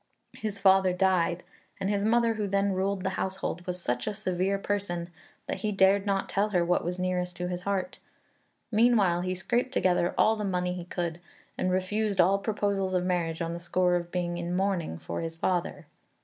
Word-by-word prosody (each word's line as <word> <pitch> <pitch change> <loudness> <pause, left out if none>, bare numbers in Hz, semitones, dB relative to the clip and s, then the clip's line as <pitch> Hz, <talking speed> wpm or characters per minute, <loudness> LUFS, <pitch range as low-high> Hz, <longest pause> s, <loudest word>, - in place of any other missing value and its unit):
His 210 -2 -5
father 190 -1 +5
died, 180 -2 +1 0.4
and 195 - -1
his 200 0 0
mother 230 +1 +3
who 215 -2 -2
then 200 0 +1
ruled 190 0 -1
the 190 - 0
household 190 -2 -3
was 180 0 -3
such 125 -6 -2
a 210 - -2
severe 190 -1 0
person 190 -4 -3 0.3
that - - -3
he 210 +2 -2
dared 195 +1 +3
not 195 -1 0
tell 205 +2 +1
her 180 -4 +2
what 175 +1 +1
was 180 +1 -3
nearest 180 -1 -1
to 180 0 -3
his 180 0 -3
heart. 200 +5 -2 0.7
Meanwhile 210 -6 +4
he 185 +1 -2
scraped 240 +7 0
together 180 -5 +2
all 220 - +4
the 215 - -4
money 180 -2 -1
he 180 -1 -6
could; 175 -2 -3 0.4
and 185 - 0
refused 195 +2 0
all 190 +3 +5
proposals 200 -2 -1
of 180 0 +1
marriage 170 -2 -1
on 165 0 -3
the 170 - -5
score 180 +1 +1
of 175 -1 -2
being 175 -1 -2
in 175 +1 -2
mourning 185 - -1
for 85 +1 -5
his 165 0 -4
father. 170 -3 -1
185 Hz, 195 wpm, -28 LUFS, 175-200 Hz, 0.7 s, father